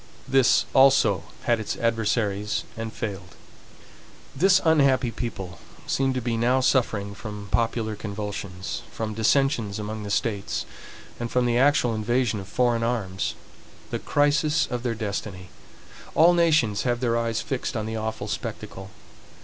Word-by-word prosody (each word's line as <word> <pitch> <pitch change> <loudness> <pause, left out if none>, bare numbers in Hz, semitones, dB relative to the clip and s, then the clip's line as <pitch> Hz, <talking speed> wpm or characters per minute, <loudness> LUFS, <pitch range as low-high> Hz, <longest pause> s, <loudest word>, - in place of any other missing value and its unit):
This 135 -1 +4
also 135 -10 +5 0.2
had 120 -2 +2
its 110 - -3
adversaries 105 -3 0
and 115 0 -5
failed. 95 -7 -6 1.0
This 185 +6 +5
unhappy 140 -6 +4
people 95 -6 -6 0.3
seem 135 0 +1
to 130 - -1
be 115 -1 -1
now 125 +3 +3
suffering 110 -6 +1
from 105 -1 -8
popular 115 -2 0
convulsions, 100 -3 -5
from 110 -1 -4
dissensions 115 -2 +1
among 110 0 -5
the 105 - -6
states, 100 -1 -1 0.5
and 120 0 -3
from 125 +1 +1
the 120 0 +2
actual 135 -3 +3
invasion 110 0 0
of 95 - -8
foreign 120 +2 +1
arms, 110 -6 -2 0.6
the - - -2
crisis 150 +2 +2
of 125 -2 -4
their 120 -2 -2
destiny. 100 -3 -5 0.7
All 170 +2 +6
nations 155 -12 +3
have 120 -1 0
their 120 -2 +1
eyes 115 -1 0
fixed 130 -3 -3
on 110 - -2
the 110 0 -4
awful 110 0 -4
spectacle. 95 0 -6
115 Hz, 140 wpm, -25 LUFS, 105-130 Hz, 1.0 s, All